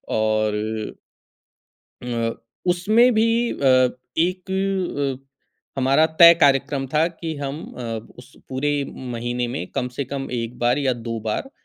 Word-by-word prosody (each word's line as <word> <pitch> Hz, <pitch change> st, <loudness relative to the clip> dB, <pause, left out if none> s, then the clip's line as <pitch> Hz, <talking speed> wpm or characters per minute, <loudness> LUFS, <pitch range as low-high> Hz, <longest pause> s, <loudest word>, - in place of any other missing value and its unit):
और 110 Hz, 0 st, -1 dB, 1.1 s
अ, 115 Hz, -2 st, -2 dB, 0.3 s
उसमें 215 Hz, +8 st, +4 dB
भी 220 Hz, +1 st, +3 dB, 0.3 s
अ, 130 Hz, -2 st, +4 dB, 0.3 s
एक 185 Hz, -5 st, -1 dB, 0.6 s
हमारा 135 Hz, +4 st, +4 dB
तय 170 Hz, 0 st, +11 dB
कार्यक्रम 140 Hz, -1 st, +3 dB
था 155 Hz, +2 st, +4 dB
कि 165 Hz, -1 st, -6 dB
हम 140 Hz, +2 st, -5 dB, 0.2 s
अ, -, -, -5 dB, 0.4 s
उस 125 Hz, +2 st, -15 dB
पूरे 135 Hz, +3 st, -1 dB, 0.4 s
महीने 120 Hz, +1 st, -2 dB
में -, -, -4 dB
कम 125 Hz, -, -1 dB
से 140 Hz, -, -1 dB
कम 135 Hz, +1 st, -5 dB
1 115 Hz, +1 st, -6 dB
बार 120 Hz, +3 st, +2 dB
या 135 Hz, -3 st, +1 dB, 0.2 s
2 115 Hz, 0 st, -2 dB
बार 270 Hz, -, -3 dB
135 Hz, 130 wpm, -22 LUFS, 120-165 Hz, 1.1 s, तय